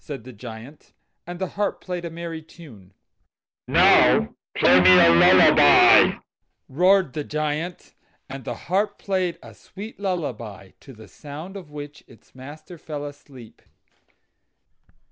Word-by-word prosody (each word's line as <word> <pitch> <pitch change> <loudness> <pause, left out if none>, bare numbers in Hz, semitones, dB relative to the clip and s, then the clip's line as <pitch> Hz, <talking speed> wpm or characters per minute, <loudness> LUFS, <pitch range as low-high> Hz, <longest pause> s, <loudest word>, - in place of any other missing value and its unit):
said 140 -7 -9
the 130 +1 -12
Giant. 115 +6 -13 0.3
And 175 0 -7
the 190 0 -4
harp 205 0 -3
played 180 -2 -7
a - - -5
merry 165 -1 -8
tune. 140 - -17 0.8
"Now 65 +4 +3 0.2
play 90 - +5
me 90 0 +6
a 85 - +6
lullaby," 85 - +5 0.5
roared 180 +2 +2
the 150 -1 -5
Giant; 155 +4 -5 0.3
and 135 0 -9
the 120 - -6
harp 195 +6 -1
played 185 -3 -3
a - - -14
sweet 205 +3 -12
lullaby, 120 - -6
to 135 - -15
the 110 -2 -15
sound 150 - -11
of 185 -6 -11
which 150 0 -11
its 120 - -22
master 150 +6 -13
fell 150 -2 -7
asleep. 140 -5 -14
150 Hz, 135 wpm, -22 LUFS, 125-175 Hz, 0.8 s, me